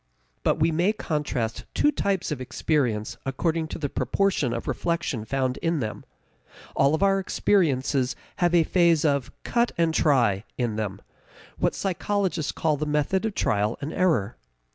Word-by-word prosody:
But -, -, +2 dB
we 160 Hz, +1 st, +2 dB
may 175 Hz, +6 st, +2 dB
contrast 145 Hz, -, -2 dB
two 295 Hz, -, +4 dB
types 195 Hz, -, -1 dB
of 140 Hz, -4 st, -3 dB
experience 125 Hz, -5 st, -1 dB
according 160 Hz, +4 st, -1 dB
to -, -, -6 dB
the 145 Hz, -, -2 dB
proportion 140 Hz, +2 st, 0 dB
of 115 Hz, 0 st, -4 dB
reflection 160 Hz, -9 st, -2 dB
found 130 Hz, +1 st, -1 dB
in 165 Hz, -1 st, 0 dB
them. 110 Hz, -4 st, -4 dB, 0.7 s
All 140 Hz, +3 st, +3 dB
our 195 Hz, 0 st, +4 dB
experiences 140 Hz, -9 st, +1 dB, 0.2 s
have 175 Hz, -2 st, +2 dB
a 170 Hz, -, +6 dB
phase 170 Hz, -2 st, +3 dB
of 140 Hz, -4 st, +1 dB
"cut 240 Hz, 0 st, +1 dB
and 165 Hz, -1 st, +2 dB
try" 120 Hz, -12 st, +3 dB
in 120 Hz, -4 st, -1 dB
them 100 Hz, -2 st, -4 dB, 0.6 s
what -, -, +1 dB
psychologists 190 Hz, -3 st, -1 dB
call 155 Hz, -2 st, 0 dB
the 150 Hz, +1 st, -2 dB
method 150 Hz, +7 st, +1 dB
of 215 Hz, -, -5 dB
trial 105 Hz, +2 st, +1 dB
and 145 Hz, +2 st, -5 dB
error. 165 Hz, -, +1 dB
150 Hz, 155 wpm, -25 LUFS, 125-175 Hz, 0.7 s, a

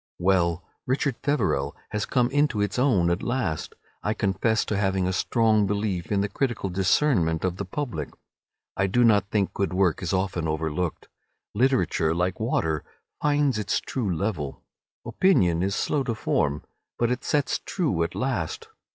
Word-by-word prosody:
Well, 85 Hz, -2 st, +2 dB, 0.2 s
"Richard 135 Hz, +2 st, 0 dB
Feverel" 75 Hz, -, 0 dB
has 105 Hz, -1 st, -2 dB
come 125 Hz, -1 st, +1 dB
into 145 Hz, -5 st, +2 dB
its 105 Hz, +3 st, 0 dB
own 100 Hz, -11 st, +3 dB
at 85 Hz, -, -1 dB
last. 120 Hz, -, -2 dB, 0.3 s
I 105 Hz, +1 st, -1 dB
confess 100 Hz, +3 st, +1 dB
to 110 Hz, -, -2 dB
having 95 Hz, -2 st, +1 dB
a 95 Hz, -, 0 dB
strong 110 Hz, 0 st, +2 dB
belief 100 Hz, -5 st, -2 dB
in 100 Hz, -1 st, +2 dB
the 100 Hz, -, 0 dB
critical 110 Hz, -2 st, -2 dB
discernment 90 Hz, -, +2 dB
of 90 Hz, -1 st, -1 dB
the 100 Hz, -, -3 dB
public. 95 Hz, -, -4 dB, 0.7 s
I 95 Hz, -, +1 dB
do 120 Hz, +6 st, +3 dB
not 105 Hz, -4 st, +4 dB
think 100 Hz, -3 st, 0 dB
good 100 Hz, -2 st, -1 dB
work 95 Hz, -4 st, +2 dB
is 90 Hz, -, -2 dB
often 95 Hz, -3 st, -1 dB
overlooked. 80 Hz, +2 st, -2 dB, 0.5 s
Literature, 110 Hz, -9 st, +2 dB
like 90 Hz, +2 st, -1 dB
water, 80 Hz, -, 0 dB, 0.4 s
finds 145 Hz, -5 st, +2 dB
its 105 Hz, -1 st, 0 dB
true 115 Hz, -8 st, -3 dB
level. 85 Hz, -6 st, -3 dB, 0.4 s
Opinion 90 Hz, -, +3 dB
is 95 Hz, +2 st, 0 dB
slow 145 Hz, -, 0 dB
to 120 Hz, -3 st, -1 dB
form, 75 Hz, -8 st, 0 dB, 0.3 s
but 120 Hz, 0 st, +1 dB
it 125 Hz, -, -2 dB
sets 145 Hz, -3 st, 0 dB
true 150 Hz, -, -1 dB
at 85 Hz, -, -1 dB
last. 430 Hz, -, -2 dB
100 Hz, 160 wpm, -25 LUFS, 90-125 Hz, 0.7 s, not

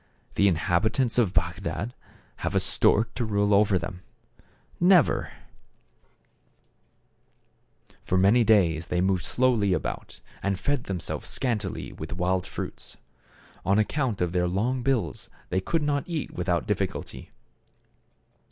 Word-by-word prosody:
The 100 Hz, -, +3 dB
inhabitants 105 Hz, -, +1 dB
of 110 Hz, -7 st, +2 dB
Bagdad 115 Hz, +4 st, -2 dB, 0.4 s
have -, -, -3 dB
a -, -, +5 dB
stork 110 Hz, +2 st, +3 dB
to 120 Hz, -, -2 dB
rule 105 Hz, -1 st, +1 dB
over 100 Hz, -1 st, +4 dB
them? 90 Hz, 0 st, -6 dB, 0.8 s
Never! 180 Hz, -1 st, +4 dB, 2.7 s
For 90 Hz, -, 0 dB
many 100 Hz, +6 st, +5 dB
days 85 Hz, -7 st, +3 dB
they 90 Hz, -, -1 dB
moved 95 Hz, 0 st, +1 dB
slowly 120 Hz, -7 st, +2 dB
about, -, -, -4 dB, 0.2 s
and 100 Hz, -1 st, -1 dB
fed 145 Hz, +4 st, -1 dB
themselves 90 Hz, -5 st, -4 dB
scantily 110 Hz, -7 st, -2 dB
with -, -, -7 dB
wild 90 Hz, +1 st, 0 dB
fruits. -, -, -7 dB, 0.7 s
On 100 Hz, +2 st, +2 dB
account 115 Hz, -1 st, 0 dB
of 90 Hz, -1 st, 0 dB
their 90 Hz, 0 st, +1 dB
long 115 Hz, +8 st, -1 dB
bills 130 Hz, -2 st, -1 dB, 0.2 s
they 95 Hz, +1 st, 0 dB
could 165 Hz, -, -1 dB
not 145 Hz, -1 st, 0 dB
eat 165 Hz, -4 st, -3 dB
without -, -, -1 dB
difficulty. -, -, -3 dB
100 Hz, 125 wpm, -26 LUFS, 90-125 Hz, 2.7 s, a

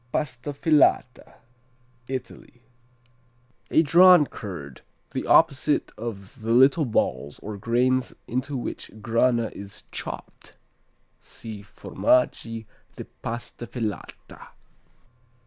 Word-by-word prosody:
Pasta 135 Hz, -1 st, -3 dB
Filata 145 Hz, -3 st, +2 dB, 0.7 s
Italy 125 Hz, -1 st, -7 dB, 1.1 s
A 160 Hz, -, +4 dB
"drawn" 175 Hz, +1 st, +7 dB
curd, 85 Hz, -, -8 dB, 0.3 s
the -, -, -4 dB
opposite 140 Hz, +2 st, +3 dB
of 110 Hz, 0 st, -8 dB
the 115 Hz, +1 st, 0 dB
little 135 Hz, +5 st, +5 dB
balls 70 Hz, -, -1 dB
or 105 Hz, 0 st, -7 dB
grains 125 Hz, +5 st, 0 dB
into 130 Hz, +3 st, -2 dB
which 120 Hz, -, -5 dB
Grana 115 Hz, 0 st, +2 dB
is 100 Hz, 0 st, -9 dB
chopped.(See 110 Hz, -3 st, -10 dB
Formaggi 115 Hz, -, 0 dB, 0.3 s
di -, -, -7 dB, 0.2 s
Pasta 120 Hz, +1 st, -6 dB
Filata.) 110 Hz, -7 st, -6 dB
120 Hz, 90 wpm, -25 LUFS, 110-140 Hz, 1.1 s, drawn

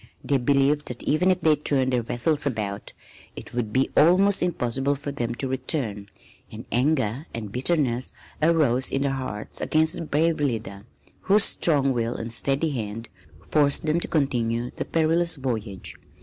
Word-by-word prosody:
They 140 Hz, -1 st, +1 dB
believed 140 Hz, +3 st, +2 dB
that 125 Hz, -, -3 dB
even 180 Hz, +5 st, +2 dB
if 185 Hz, -1 st, +1 dB
they 155 Hz, -1 st, +4 dB
turned 135 Hz, -3 st, +1 dB
their 125 Hz, -, +2 dB
vessels 145 Hz, +6 st, 0 dB
about 105 Hz, -6 st, -4 dB, 0.4 s
it -, -, -10 dB
would 120 Hz, -3 st, -2 dB
be 130 Hz, +4 st, +1 dB
almost 185 Hz, +6 st, +4 dB
impossible 135 Hz, -5 st, 0 dB
for 140 Hz, +1 st, -6 dB
them 120 Hz, -4 st, -3 dB
to 135 Hz, -, -1 dB
return, 125 Hz, -6 st, -3 dB, 0.4 s
and 110 Hz, +3 st, -9 dB
anger 130 Hz, +1 st, 0 dB
and 110 Hz, -3 st, -6 dB
bitterness 130 Hz, -1 st, +1 dB, 0.3 s
arose 150 Hz, -6 st, +3 dB
in 135 Hz, -, 0 dB
their 140 Hz, -, 0 dB
hearts 130 Hz, -6 st, -4 dB
against 160 Hz, 0 st, +2 dB
their 165 Hz, -, -4 dB
brave 160 Hz, +2 st, +1 dB
leader 110 Hz, -7 st, -3 dB, 0.3 s
whose 205 Hz, +1 st, +4 dB
strong 140 Hz, -8 st, +3 dB
will 115 Hz, 0 st, -2 dB
and 115 Hz, 0 st, -3 dB
steady 140 Hz, +6 st, 0 dB
hand 115 Hz, -2 st, -5 dB, 0.4 s
forced 145 Hz, 0 st, +2 dB
them 155 Hz, +2 st, +1 dB
to -, -, -4 dB
continue 120 Hz, -5 st, -1 dB
the -, -, -4 dB
perilous 165 Hz, +1 st, +1 dB
voyage. 115 Hz, -8 st, -4 dB
135 Hz, 165 wpm, -24 LUFS, 120-155 Hz, 0.4 s, they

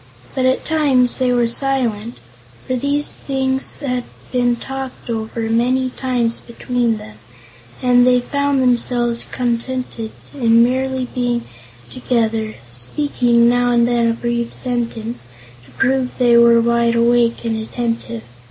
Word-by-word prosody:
But 260 Hz, -1 st, +1 dB
at 260 Hz, -, 0 dB
times 275 Hz, -6 st, +2 dB
they 255 Hz, -1 st, +2 dB
were 240 Hz, -1 st, +2 dB
silent, 235 Hz, -3 st, -1 dB, 0.5 s
for 255 Hz, -, -1 dB
these 280 Hz, +3 st, 0 dB
things 265 Hz, 0 st, -2 dB
had 250 Hz, -3 st, -2 dB, 0.3 s
been 245 Hz, -1 st, +2 dB
talked 265 Hz, 0 st, -7 dB
over 225 Hz, 0 st, -4 dB
many 245 Hz, +3 st, +1 dB
times 245 Hz, -3 st, -1 dB
between 235 Hz, -1 st, -2 dB
them, 110 Hz, -, -12 dB, 0.7 s
and 245 Hz, -1 st, +5 dB
they 250 Hz, 0 st, +5 dB
found 280 Hz, +1 st, 0 dB
themselves 240 Hz, -1 st, +2 dB
contented 240 Hz, -1 st, -3 dB, 0.2 s
in 235 Hz, -4 st, +4 dB
merely 260 Hz, +1 st, 0 dB
being 245 Hz, -1 st, -1 dB, 0.5 s
together, 225 Hz, -3 st, -1 dB, 0.2 s
speaking 235 Hz, -, +1 dB
now 245 Hz, 0 st, +2 dB
and 240 Hz, -1 st, +3 dB
then 235 Hz, -1 st, +2 dB
a -, -, +1 dB
brief 235 Hz, 0 st, -2 dB
sentence 235 Hz, -, -2 dB, 0.4 s
to 130 Hz, -, -19 dB
prove 265 Hz, -1 st, 0 dB
they 240 Hz, -2 st, +4 dB
were 235 Hz, 0 st, +6 dB
wide 235 Hz, 0 st, +2 dB
awake 235 Hz, 0 st, +2 dB
and 225 Hz, -1 st, -1 dB
attentive. 230 Hz, -, -4 dB
240 Hz, 135 wpm, -18 LUFS, 235-255 Hz, 0.7 s, were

